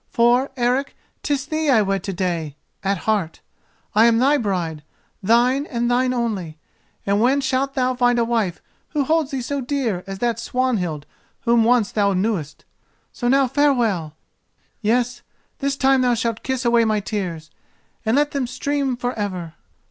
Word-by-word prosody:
For, 240 Hz, +3 st, +3 dB
Eric, 250 Hz, +3 st, 0 dB, 0.2 s
'tis 285 Hz, -2 st, -1 dB
thee 310 Hz, 0 st, -1 dB
I 225 Hz, -6 st, +5 dB
wed 195 Hz, -1 st, -1 dB
to 195 Hz, -, -2 dB
day—at 180 Hz, +1 st, -3 dB
heart 200 Hz, -4 st, -1 dB, 0.5 s
I 220 Hz, +2 st, +5 dB
am 230 Hz, -1 st, +4 dB
thy 270 Hz, +5 st, +4 dB
bride, 180 Hz, -, -2 dB, 0.4 s
thine 245 Hz, +7 st, +3 dB
and 240 Hz, -2 st, -1 dB
thine 250 Hz, +1 st, +2 dB
only; 210 Hz, -10 st, -2 dB, 0.5 s
and 200 Hz, +1 st, +2 dB
when 260 Hz, +4 st, +3 dB
shalt 270 Hz, 0 st, -1 dB
thou 255 Hz, -1 st, +1 dB
find 245 Hz, -1 st, +2 dB
a 235 Hz, -, +2 dB
wife 225 Hz, -7 st, -1 dB, 0.3 s
who 295 Hz, -2 st, +1 dB
holds 315 Hz, 0 st, +1 dB
thee 270 Hz, -3 st, -3 dB
so 280 Hz, +2 st, -2 dB
dear 245 Hz, -8 st, -2 dB
as 195 Hz, 0 st, -5 dB
that 235 Hz, +1 st, -1 dB
Swanhild 215 Hz, -, -1 dB, 0.4 s
whom 235 Hz, -1 st, +3 dB
once 235 Hz, -2 st, +3 dB
thou 200 Hz, -2 st, +2 dB
knewest? 185 Hz, -6 st, -2 dB, 0.5 s
So 240 Hz, -, -3 dB
now 270 Hz, +1 st, +4 dB
farewell! 235 Hz, -, +1 dB, 0.7 s
Yes, 240 Hz, +3 st, 0 dB, 0.4 s
this 275 Hz, -1 st, -1 dB
time 270 Hz, -1 st, +3 dB
thou 245 Hz, -1 st, +3 dB
shalt 230 Hz, -1 st, -2 dB
kiss 260 Hz, -1 st, -2 dB
away 235 Hz, -1 st, +4 dB
my 215 Hz, -1 st, +1 dB
tears; 180 Hz, -7 st, -4 dB, 0.5 s
then 220 Hz, +1 st, +1 dB
let 295 Hz, +1 st, +2 dB
them 275 Hz, -3 st, -1 dB
stream 270 Hz, +1 st, -1 dB
for 245 Hz, +1 st, -2 dB
ever. 185 Hz, -6 st, -4 dB
235 Hz, 165 wpm, -21 LUFS, 200-260 Hz, 0.7 s, I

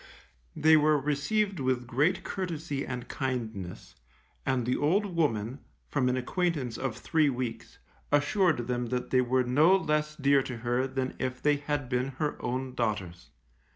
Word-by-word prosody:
They 160 Hz, +1 st, +6 dB
were 155 Hz, 0 st, +4 dB
received 165 Hz, +8 st, 0 dB
with 130 Hz, -2 st, 0 dB
great 145 Hz, +10 st, +1 dB
courtesy 165 Hz, -7 st, -3 dB
and 125 Hz, -2 st, -5 dB
kindness, 115 Hz, -9 st, -4 dB, 0.5 s
and 130 Hz, -3 st, +1 dB
the 125 Hz, -, +1 dB
old 185 Hz, +5 st, +1 dB
woman, 120 Hz, -5 st, 0 dB, 0.3 s
from 130 Hz, -3 st, +1 dB
an 125 Hz, -, +1 dB
acquaintance 140 Hz, -3 st, -1 dB
of 130 Hz, -4 st, -3 dB
three 155 Hz, -2 st, +2 dB
weeks, 125 Hz, -3 st, -4 dB, 0.3 s
assured 145 Hz, -, +2 dB
them 120 Hz, 0 st, -2 dB
that 125 Hz, 0 st, -3 dB
they 130 Hz, -, +5 dB
were 125 Hz, +1 st, +2 dB
no 150 Hz, +9 st, +5 dB
less 150 Hz, -4 st, 0 dB
dear 140 Hz, -1 st, +4 dB
to 125 Hz, -2 st, -5 dB
her 120 Hz, +2 st, +1 dB
than 130 Hz, -1 st, -2 dB
if 130 Hz, 0 st, -2 dB
they 145 Hz, +1 st, +3 dB
had 145 Hz, -1 st, -2 dB
been 125 Hz, +2 st, -1 dB
her 150 Hz, 0 st, -1 dB
own 130 Hz, +1 st, -2 dB
daughters. 100 Hz, -8 st, -3 dB
130 Hz, 155 wpm, -29 LUFS, 125-150 Hz, 0.5 s, They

